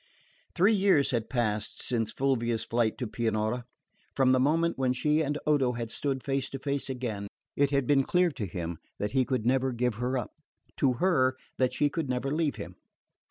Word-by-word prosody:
Three 195 +6 +5
years 195 -8 +3
had 115 -3 -1
passed 110 -4 -1
since 115 -3 -1
Fulvia's 120 -4 0
flight 115 -2 0
to 125 - -3
Pianura. 110 +1 -1 0.5
From 130 -1 +4
the 130 - +4
moment 165 +5 +2
when 130 -1 +1
she 150 +4 +1
and 145 -1 -1
Odo 135 -5 +2
had 115 -1 -4
stood 135 -3 -2
face 135 -1 -1
to 135 - -5
face 140 0 -2
again, 115 -6 -3 0.3
it 140 0 +3
had 140 -2 +1
been 140 +1 +4
clear 180 +5 +2
to 115 -8 -4
him 85 -2 -5 0.2
that 105 - -2
he 130 -1 +2
could 125 -4 -1
never 130 +1 +2
give 125 0 0
her 125 +2 0
up, 125 - -4 0.5
to 135 -3 +3
her 130 -3 +2 0.2
that 130 -1 +3
she 145 - +3
could 145 -1 -3
never 130 +2 -1
leave 155 -1 0
him. - - -8
130 Hz, 195 wpm, -29 LUFS, 120-140 Hz, 0.5 s, Three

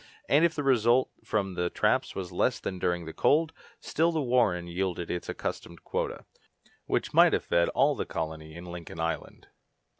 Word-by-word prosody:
and 145 +3 +4
if 170 -1 +3
the 145 - -2
result 125 -1 +3
from 100 -3 -1
the 90 0 -1
traps - - +1
was 95 -2 -5
less 115 +7 +1
than 95 - -5
during 85 -1 -1
the 80 - -7
cold, 160 +2 +2 0.3
still 165 +2 +1
the 160 - -1
warren 120 - +2
yielded 90 0 -3
its 90 - -4
accustomed 85 - -5
quota, - - -3 0.6
which - - -1
might - - +6
have - - 0
fed 85 0 +2
all 145 +2 +3
the - - -2
colony 80 -2 -5
in 85 +1 -9
Lincoln 85 -2 -8
Island. 80 0 -4
90 Hz, 180 wpm, -28 LUFS, 85-130 Hz, 0.6 s, might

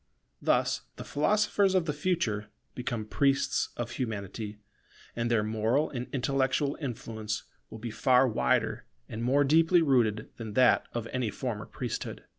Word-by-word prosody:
Thus - - +2
the - - -7
philosophers 200 +4 +2
of 180 -3 +3
the 150 - -1
future 145 - -1 0.3
become 120 -3 -3
priests 135 +5 +1
of 120 0 -3
Humanity, 105 -3 -4 0.6
and 115 0 -1
their 115 -3 +2
moral 110 +7 +1
and 125 -2 -4
intellectual 135 +1 +1
influence 110 -5 -4 0.3
will - - -8
be 115 +1 -5
far 130 +3 +4
wider 65 - 0 0.2
and 110 - -6
more 135 +4 +4
deeply 165 +4 +5
rooted 115 -7 +2
than 110 -3 -6
that 125 +3 +4
of 120 -2 -3
any 125 -3 -1
former 105 0 -4
priesthood. 125 -3 -5
125 Hz, 145 wpm, -29 LUFS, 110-140 Hz, 0.6 s, deeply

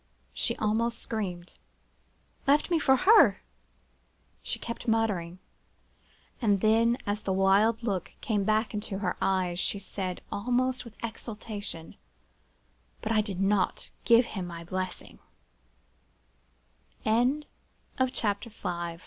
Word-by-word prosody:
she - - -1
almost 230 +2 0
screamed. 180 -7 -4 0.9
'Left 290 +5 +3
me 335 - +4
for 265 -3 +5
her!' 330 - +6 1.0
she - - -3
kept 235 +1 -7
muttering; 205 -7 0 1.0
and 205 -4 +3
then, 230 +2 +4
as 205 +1 -1
the 195 - -2
wild 200 +5 +3
look 195 -6 -2
came 215 -6 0
back 215 +3 +1
into 205 -2 -3
her 190 -2 -1
eyes, 185 -2 +1
she 200 - 0
said, 190 -1 -4
almost 250 +4 0
with 225 -2 -12
exultation, 210 -6 -6 1.1
'But - - -1
I 215 -1 +4
did 200 -4 -5
not 195 -1 +1
give 235 +1 +6
him 190 -4 -3
my 170 -1 -7
blessin 185 +1 -5
210 Hz, 105 wpm, -29 LUFS, 190-230 Hz, 1.1 s, her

